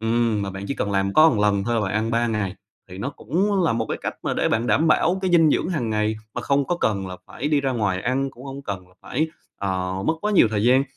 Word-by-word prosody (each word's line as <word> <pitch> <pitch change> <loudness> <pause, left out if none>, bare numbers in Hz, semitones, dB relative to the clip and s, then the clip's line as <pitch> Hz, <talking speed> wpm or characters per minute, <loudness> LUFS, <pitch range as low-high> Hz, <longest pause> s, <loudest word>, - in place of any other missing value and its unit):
Ừm, 115 -2 +1
mà 100 - -3
bạn 95 +1 -7
chỉ 140 - -1
cần 105 - -2
làm 95 0 +1
có 155 +1 +7
một 115 - -1
lần 100 -1 +2
thôi 120 +2 0
là 115 - +2
bạn 95 -2 -1
ăn 110 +2 0
3 115 +1 +1
ngày 105 -4 -2 0.4
thì 90 - -9
nó 135 +7 -3
cũng 185 - 0
là 160 - +2
một 115 -1 -1
cái - - -2
cách - - -3
mà - - -1
để - - +1
bạn 115 +2 0
đảm 160 +6 +3
bảo 175 +4 +3
cái 185 - +1
dinh 165 -3 +5
dưỡng 170 - +1
hàng 135 -11 -1
ngày 105 0 0 0.2
mà - - -2
không 140 0 +1
có 175 - 0
cần 100 -3 0
là 90 - -7
phải 145 +4 -4
đi 150 -2 +2
ra 135 -1 0
ngoài 105 -6 0
ăn, 135 +2 0
cũng 125 +2 -14
không 135 +1 -7
cần 95 -4 -6
là 90 - -25
phải, 155 +6 -1 0.3
ờ, 95 -1 -2
mất 160 - +3
quá 210 0 -1
nhiều 120 - +6
thời 105 -1 0
gian. 130 +3 +5
115 Hz, 290 wpm, -23 LUFS, 100-140 Hz, 0.4 s, có